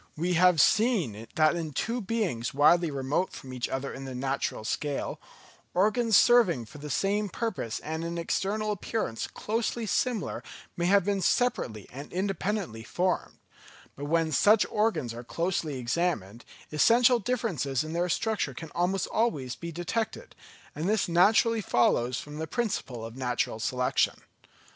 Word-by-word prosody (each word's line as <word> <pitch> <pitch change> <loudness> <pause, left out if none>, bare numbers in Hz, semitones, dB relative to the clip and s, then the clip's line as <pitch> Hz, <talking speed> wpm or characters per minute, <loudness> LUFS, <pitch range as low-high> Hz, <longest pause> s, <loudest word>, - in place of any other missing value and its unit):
We 175 +3 0
have 180 -1 +5
seen 165 - +2
that 155 +1 +4
in 160 -3 -4
two 235 - -1
beings 190 - -2
widely 170 +4 +5
remote 140 +6 -1
from 130 -3 -9
each 125 -1 -3
other 135 +1 -3
in 135 - -7
the 130 -1 -6
natural 135 -3 -2
scale, 145 +4 -3 0.5
organs 215 +3 +4
serving 210 - +5
for 145 - -13
the 150 +1 -7
same 200 +7 0
purpose 185 - -3
and 160 +1 -4
in 170 0 -4
external 210 +5 -1
appearance 205 - -3
closely 225 +1 -2
similar 230 0 -1 0.3
may 175 0 0
have 200 -1 +4
been 200 -1 0
separately 125 - 0
and 140 +3 -8
independently 190 - -2
formed; 180 +9 -1 0.6
but 145 - -6
when 165 +1 +1
such 205 +9 +5
organs 210 - 0
are 120 +1 -8
closely 165 +1 -2
examined, 120 - -2 0.3
essential 235 - +5
differences 185 - -1
in 155 +1 -6
their 175 +1 0
structure 200 - -1
can 160 +3 -8
almost 180 +2 0
always 145 - -1
be 170 0 -7
detected; 220 - -3 0.4
and 160 +6 -2
this 215 0 +2
naturally 215 +6 +4
follows 120 - +2
from 150 +4 -8
the 160 - -3
principle 145 - -3
of 115 +1 -9
natural 125 -3 -1
selection. 125 +2 0
170 Hz, 150 wpm, -28 LUFS, 135-210 Hz, 0.6 s, have